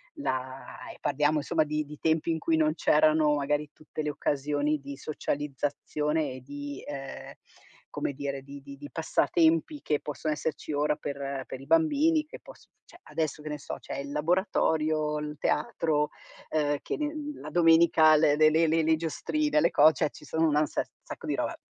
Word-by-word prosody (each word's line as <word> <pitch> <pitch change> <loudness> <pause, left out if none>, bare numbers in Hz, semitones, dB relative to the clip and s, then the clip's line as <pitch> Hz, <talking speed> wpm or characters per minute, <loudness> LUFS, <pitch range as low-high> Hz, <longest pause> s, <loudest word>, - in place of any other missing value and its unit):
la 130 - -5
e - - -16
parliamo, 150 +2 +1
insomma, 155 +2 +1
di 150 0 -2
di 150 0 -11
tempi 160 +1 +1
in 160 - -1
cui 165 0 +1
non 155 -1 +3
c'erano 155 -1 +4
magari 145 +1 -1
tutte 155 0 -7
le 150 - -2
occasioni 145 +1 0
di 140 0 -8
socializzazione 150 +1 -2
e 130 - -9
di 145 +1 -7
ehm, 135 -2 -7 0.6
come 140 - -2
dire, 140 -1 -4
di 140 0 -10
di 140 0 -11
di 145 +1 -9
passatempi 165 - +2
che 150 -1 0
posso 150 +1 -6
esserci 155 0 -2
ora 150 +1 +1
per 140 -2 -4
per 130 - -7
i 135 - -11
bambini, 285 - +3
che - - -11
poss - - -15 0.2
cioè, 345 - -17
adesso, 155 -2 -3
che 155 - -6
ne 150 - -3
so, - - -6
c'è - - -7
il 140 0 -5
laboratorio, 155 -2 +1
l 150 0 -5
teatro, 150 0 0 0.4
uhm, 145 -2 +1
che - - -3
nen 300 0 -3
la - - -7
domenica 165 -2 +6
l - - +4 0.2
le 155 0 +6
le 160 +1 +3
le 160 +1 +2
le 160 0 +4
giostrine, 295 - 0
le - - +3
co 155 +2 +7
cioè, 155 -2 0
ci - - -14
sono 160 +2 +1
un 150 - +1
ansar 150 -1 0
sacco - - -9
di - - -1
roba, - - -2
150 Hz, 185 wpm, -28 LUFS, 145-160 Hz, 0.6 s, co